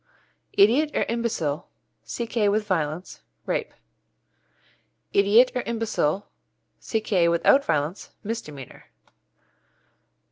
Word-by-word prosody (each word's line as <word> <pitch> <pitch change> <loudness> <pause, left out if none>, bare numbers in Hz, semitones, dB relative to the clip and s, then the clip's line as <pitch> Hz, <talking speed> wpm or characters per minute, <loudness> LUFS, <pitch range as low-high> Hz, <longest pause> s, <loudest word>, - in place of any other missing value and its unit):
Idiot 245 +10 +4
or - - +2
imbecile 215 -10 -2 0.4
C.K. 230 -3 -1
with 210 +1 +1
violence 165 - -2 0.2
Rape. - - -2 1.4
Idiot 210 +6 +5
or 250 - -1
imbecile 220 -6 -1 0.5
C.K. 215 -6 +1
without 170 +11 +4
violence 150 - -2
Misdemeanour. 150 - -7
205 Hz, 80 wpm, -25 LUFS, 165-230 Hz, 1.4 s, Idiot